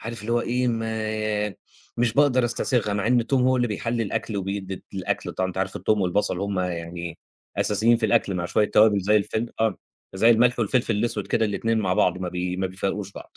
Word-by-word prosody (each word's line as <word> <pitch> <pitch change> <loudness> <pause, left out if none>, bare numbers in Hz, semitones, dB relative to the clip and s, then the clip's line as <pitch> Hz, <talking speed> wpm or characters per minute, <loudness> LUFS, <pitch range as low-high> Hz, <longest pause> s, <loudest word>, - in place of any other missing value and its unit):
عارف 115 -1 -5
اللي 115 +3 -3
هو 120 - +2
إيه، 125 +1 0
ما 110 -2 -2 0.4
مش 120 -1 +2
باقدر 135 -3 +4
أستسيغها، 120 -2 +1
مع 100 +1 -1
إن 125 0 +4
التوم 130 +2 +1
هو 130 0 +3
اللي 120 -1 +1
بيحلّي 115 +2 -2
الأكل 110 0 -3
وبيدي 95 -1 -4
الأكل، 95 -2 -3
طبعًا 95 0 -1
أنت 95 - -6
عارف 95 0 -1
التوم 105 +3 +1
والبصل 95 0 0
هُم 100 -1 -2
يعني 85 -1 -5 0.4
أساسيين 110 +3 +3
في 115 -1 0
الأكل، 105 -5 +1
مع 85 - -2
شويّة 105 - +2
توابل 105 -2 +5
زي 105 +3 +3
الفِل 110 +3 -1
آه، 110 -3 +1 0.4
زي 110 +5 +4
الملح 120 +2 +4
والفلفل 115 -1 +1
الأسود 115 +3 -1
كده، 115 - +1
الاتنين 110 +2 0
مع 95 -3 0
بعض 90 0 +2
ما 90 - -3
بي 90 +1 -3
ما 95 - -1
بيفارقوش 95 +1 -3
بعض. - - -12
105 Hz, 205 wpm, -24 LUFS, 95-115 Hz, 0.4 s, توابل